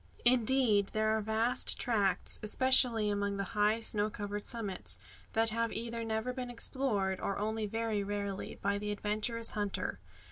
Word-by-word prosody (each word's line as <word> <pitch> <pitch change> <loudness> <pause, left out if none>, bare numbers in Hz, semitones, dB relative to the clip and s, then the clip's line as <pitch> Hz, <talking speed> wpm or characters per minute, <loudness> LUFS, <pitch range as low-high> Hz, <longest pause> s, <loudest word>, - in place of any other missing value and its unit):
Indeed, 240 -4 +3
there 215 0 +1
are 220 - -1
vast 220 +3 +5
tracts, 200 -6 +1
especially 230 -1 +3
among 200 0 -2
the 200 - -2
high 210 +2 +2
snow 210 -1 +1
covered 205 0 -5
summits, 210 -6 -1 0.4
that 225 0 +2
have 230 +1 -1
either 230 0 -4
never 220 +2 -2
been 250 -1 -5
explored, 220 -6 -2
or 195 - -3
only 215 +1 -2
very 220 -1 -2
rarely, 200 -1 -4
by 200 +1 0
the 210 0 -4
adventurous 215 +3 -2
hunter. 200 - -3
215 Hz, 150 wpm, -32 LUFS, 205-230 Hz, 0.4 s, vast